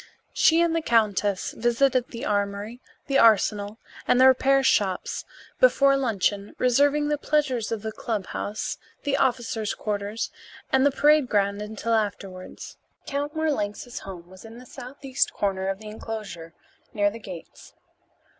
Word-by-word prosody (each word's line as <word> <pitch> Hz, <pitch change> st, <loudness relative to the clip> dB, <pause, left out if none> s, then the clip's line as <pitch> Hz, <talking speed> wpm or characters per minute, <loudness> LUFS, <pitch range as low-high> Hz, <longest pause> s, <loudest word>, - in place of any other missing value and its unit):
She 330 Hz, +1 st, +4 dB
and 335 Hz, -1 st, +2 dB
the 330 Hz, -, +1 dB
countess 210 Hz, -6 st, +1 dB
visited 245 Hz, +2 st, +1 dB
the 235 Hz, +3 st, -7 dB
armory, 205 Hz, +3 st, -2 dB, 0.2 s
the 275 Hz, -1 st, +2 dB
arsenal, 210 Hz, -1 st, +3 dB, 0.3 s
and 250 Hz, -, +4 dB
the 260 Hz, -, +7 dB
repair 270 Hz, +1 st, +4 dB
shops 195 Hz, -7 st, 0 dB, 0.3 s
before 275 Hz, -, +5 dB
luncheon, 205 Hz, -6 st, -1 dB
reserving 285 Hz, +4 st, +2 dB
the 295 Hz, -1 st, 0 dB
pleasures 270 Hz, -8 st, 0 dB
of 225 Hz, -2 st, -3 dB
the 220 Hz, -, -3 dB
clubhouse, 210 Hz, -1 st, -4 dB, 0.2 s
the 285 Hz, -1 st, 0 dB
officers' 235 Hz, -4 st, 0 dB
quarters, 210 Hz, +1 st, -3 dB, 0.4 s
and 265 Hz, 0 st, +4 dB
the -, -, +5 dB
parade 295 Hz, -1 st, +3 dB
ground 200 Hz, 0 st, +1 dB
until 220 Hz, +2 st, -3 dB
afterwards. 195 Hz, -4 st, -4 dB, 0.3 s
Count 290 Hz, +2 st, -3 dB
Marlanx's 245 Hz, -7 st, -2 dB
home 180 Hz, -3 st, -10 dB
was 185 Hz, +1 st, -14 dB
in 225 Hz, +1 st, -11 dB
the 250 Hz, -, -12 dB
southeast 265 Hz, +2 st, -3 dB
corner 190 Hz, -2 st, -1 dB
of 195 Hz, 0 st, -1 dB
the 215 Hz, +1 st, -10 dB
enclosure, 200 Hz, -7 st, -7 dB, 0.4 s
near 205 Hz, -1 st, +2 dB
the 230 Hz, -, -9 dB
gates. 185 Hz, -6 st, -11 dB
225 Hz, 145 wpm, -25 LUFS, 205-270 Hz, 0.4 s, the